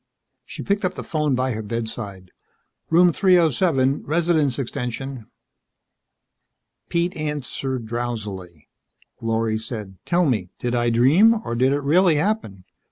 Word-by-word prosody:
She - - -8
picked 200 0 0
up 185 0 -1
the - - -6
phone 150 -4 0
by 130 +1 0
her 110 -1 -3
bedside. 105 -4 -5 0.6
"Room 175 +1 +5
307 160 - +3
Resident's 160 -4 +1
extension." 125 -1 -5 1.6
Pete 170 +1 0
answered 140 -4 -3
drowsily. 105 -8 -5 0.5
Lorry 115 -1 0
said, 105 -4 -7
"Tell 175 0 +2
me 105 - 0
did 120 0 -3
I 120 -1 +1
dream, 150 - +5
or - - -3
did 130 +3 +2
it 145 +1 0
really 165 +4 +4
happen." 150 - -1
130 Hz, 125 wpm, -22 LUFS, 115-160 Hz, 1.6 s, Room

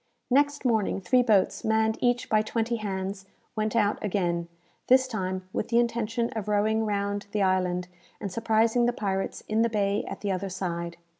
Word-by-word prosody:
Next 285 +1 +2
morning 220 -5 +1
three 220 +7 +3
boats, 215 -6 +2
manned 220 0 +1
each 245 0 +1
by 215 0 +3
twenty 225 +2 -1
hands, 195 -2 -4 0.3
went 215 0 -1
out 210 -2 +1
again 175 -4 -1 0.4
this 260 +1 +5
time 185 -5 -3
with - - -2
the 235 - +1
intention 235 0 0
of 215 -2 -5
rowing 215 +1 +1
round 200 0 -2
the 210 -2 +2
island, 180 -1 +1 0.3
and 200 - -4
surprising 225 +3 +2
the 240 - +1
pirates 195 -4 -2
in 215 +1 +1
the 230 - +3
bay 205 -2 0
at - - -6
the 205 - -1
other 190 +1 -2
side. 170 -2 -4
215 Hz, 175 wpm, -27 LUFS, 190-230 Hz, 0.4 s, this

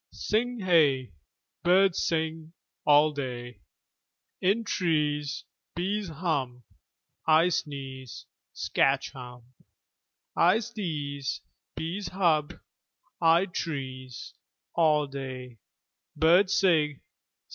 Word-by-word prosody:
Sing 245 +3 -1
hey! 150 -9 +3 0.5
Birds 185 +1 +4
sing 160 0 -2 0.3
All 150 +1 +6
day. 125 -4 -6 0.8
In 200 +5 +2
trees 150 -7 -1 0.3
Bees 195 +4 -1
hum 140 -7 -2 0.6
I 160 +2 +5
sneeze 135 -6 -5 0.3
Skatch 135 0 +1
Humb!! 125 -2 -10 0.9
I 180 +5 +5
sdeeze. 155 - -4 0.3
Bees 175 +4 -4
hub. 165 -6 +1 0.7
Id 170 +2 +4
trees 130 -5 -5 0.4
All 155 -3 +3
day 130 -3 -7 0.6
Birds 175 +5 +5
sig. 155 -6 +3
155 Hz, 80 wpm, -28 LUFS, 135-175 Hz, 0.9 s, All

